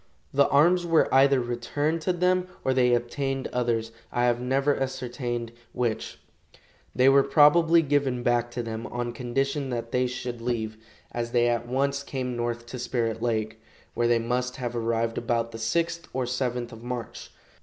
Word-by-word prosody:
The 140 0 +4
arms 175 +5 +4
were 165 -2 +2
either 135 0 +5
returned 125 +7 -2
to 185 - +1
them 180 +1 +1 0.2
or 130 - +2
they 125 -1 +4
obtained 135 +3 -2
others, 115 -2 0 0.2
I 120 - 0
have 120 0 +2
never 135 +3 +1
ascertained 125 -3 -3 0.2
which. 120 -3 -2 0.8
They 130 +2 +4
were 135 +1 +7
probably 160 +4 +5
given 135 -4 0
back 120 0 +1
to 120 - -3
them 115 0 -5
on 120 0 -3
condition 135 +4 -2
that 115 -2 -4
they 125 0 +2
should 125 -1 -5
leave, 110 -2 -2 0.3
as 120 0 -4
they 120 -1 +4
at 120 0 -1
once 140 +2 0
came 130 -3 -4
north 120 0 -3
to 125 +2 -7
Spirit 115 -2 -2
lake, 110 -2 -2 0.3
where 120 - +1
they 120 0 +4
must 125 +2 -1
have 120 -2 -4
arrived 115 0 0
about 115 -1 -1
the 115 - -8
6th 165 +8 -1
or 130 -1 -1
7th 125 -1 -2
of 115 -1 -11
March. 120 -2 -6
125 Hz, 170 wpm, -26 LUFS, 120-135 Hz, 0.8 s, were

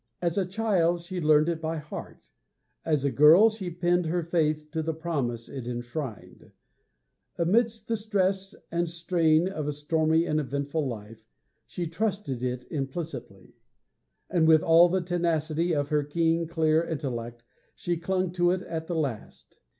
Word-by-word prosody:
As 170 -1 -1
a 195 -3 0
child 185 -4 +1
she 180 +1 -5
learned 155 0 +4
it 165 -2 -1
by 160 0 -2
heart; 150 0 -8 0.6
as 150 -4 0
a 140 - +1
girl 165 +11 +7
she 205 -4 -5
pinned 175 0 +1
her 175 +1 0
faith 155 -2 0
to 160 0 -1
the 160 0 -2
promise 140 -8 -3
it 130 -4 -7
enshrined; 120 +1 -6 0.8
amidst 220 +5 +1
the 230 - 0
stress 195 -3 -1 0.2
and 170 0 0
strain 170 -1 +2
of 155 -6 -4
a - - 0
stormy 160 +2 +1
and 155 -2 0
eventful 140 +1 -2
life 110 -1 -8 0.4
she 175 - -4
trusted 180 - -2
it 125 0 -3
implicitly; 135 - -6 0.7
and, 170 -3 +2
with 160 -1 +6
all 165 +2 +6
the 185 +1 +1
tenacity 170 -1 0
of 145 -2 0
her 150 -1 +2
keen, 165 +2 0
clear 160 -1 +2
intellect, 120 -7 -5 0.3
she 175 - -2
clung 185 +2 -1
to 175 -1 +2
it 185 +1 0
at 160 -1 -5
the 175 - -3
last. 135 -9 -5
160 Hz, 160 wpm, -27 LUFS, 150-175 Hz, 0.8 s, girl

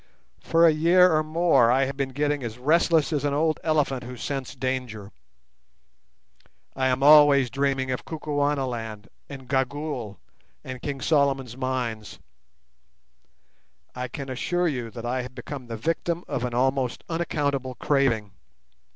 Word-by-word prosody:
For 165 +1 +3
a 165 - +7
year 175 +3 +5
or 155 - +3
more 155 -6 +3
I 135 +2 +3
have 135 +1 -5
been 135 -1 -2
getting 145 +2 -1
as 120 -2 -6
restless 160 +3 +2
as 145 -2 -1
an 145 -1 0
old 155 +1 +1
elephant 150 -5 0
who 125 +1 -8
scents 135 +2 -4
danger. 125 -5 -4 1.6
I 130 0 +1
am 130 +1 0
always 145 -3 +7
dreaming 135 -1 0
of 125 - -3
Kukuanaland 135 -8 -3 0.2
and 135 -3 -9
Gagool 135 -5 -2 0.5
and 130 -1 -7
King 140 -2 -4
Solomon's 135 -5 +1
Mines. 125 -5 -3 1.8
I 125 0 -4
can 135 +2 -7
assure 175 +7 -1
you 125 -7 -3
I 125 +2 -1
have 125 +1 -9
become 135 -4 -7
the 115 -1 -5
victim 165 +6 -2
of 125 -2 -2
an 120 -1 -4
almost 130 0 0
unaccountable 140 -6 -2
craving. 120 -9 +1
135 Hz, 140 wpm, -25 LUFS, 125-150 Hz, 1.8 s, a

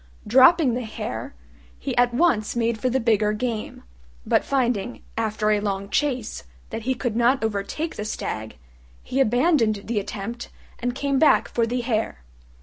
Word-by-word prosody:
Dropping 260 +4 +6
the 245 - -1
Hare, 220 +4 -6 0.4
he 265 -3 -4
at 245 0 +4
once 240 -6 +2
made 230 -1 0
for 255 - +1
the 260 +2 +1
bigger 215 -3 +2
game; 225 -1 -4 0.4
but - - +2
finding, 245 -4 -1
after 215 -1 0
a 210 - +3
long 200 -1 -3
chase, 250 - -1 0.3
that - - -4
he 260 +3 -1
could 240 -3 -2
not 240 +2 +3
overtake 220 +10 -3
the 210 - -3
stag, 110 - -4 0.5
he 265 - -2
abandoned 245 -4 +2
the 225 -2 0
attempt 220 +4 -6 0.3
and 245 +1 -2
came 275 0 0
back 310 - +5
for 230 -1 0
the 245 +2 -1
Hare. 220 - -2
235 Hz, 160 wpm, -24 LUFS, 215-255 Hz, 0.5 s, Dropping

